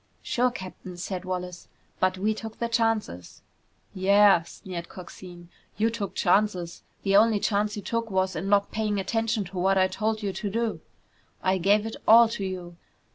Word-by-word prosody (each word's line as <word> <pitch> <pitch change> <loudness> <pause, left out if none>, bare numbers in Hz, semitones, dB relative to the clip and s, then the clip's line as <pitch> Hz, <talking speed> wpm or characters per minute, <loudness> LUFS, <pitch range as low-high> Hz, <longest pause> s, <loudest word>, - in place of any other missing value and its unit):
"Sure, 250 +1 +1
Captain," 185 -4 -9
said 185 +1 -5
Wallace, 180 -1 -5 0.3
"but 185 0 +1
we 210 +3 +1
took 220 0 -8
the 235 - -1
chances!" 225 - -1 0.5
"Yeah," 200 -1 +5
sneered 170 +1 -8
Coxine. 175 -1 -11 0.3
"You 225 +2 +2
took 210 -3 -5
chances! 180 -2 +1 0.2
The 195 -1 +2
only 215 0 +5
chance 210 0 0
you 205 - -6
took 230 +2 -2
was 190 -1 0
in 185 +5 -3
not 200 0 +3
paying 210 -2 -1
attention 225 +2 -1
to 185 0 -7
what 195 +2 +2
I 185 0 +4
told 215 +3 -2
you 195 -2 -2
to 205 - -4
do. 230 +2 -2 0.6
I 185 0 +2
gave 205 +4 +3
it 225 - -5
all 230 +1 +8
to 215 -3 -4
you. 180 -2 -6
200 Hz, 175 wpm, -26 LUFS, 185-220 Hz, 0.6 s, all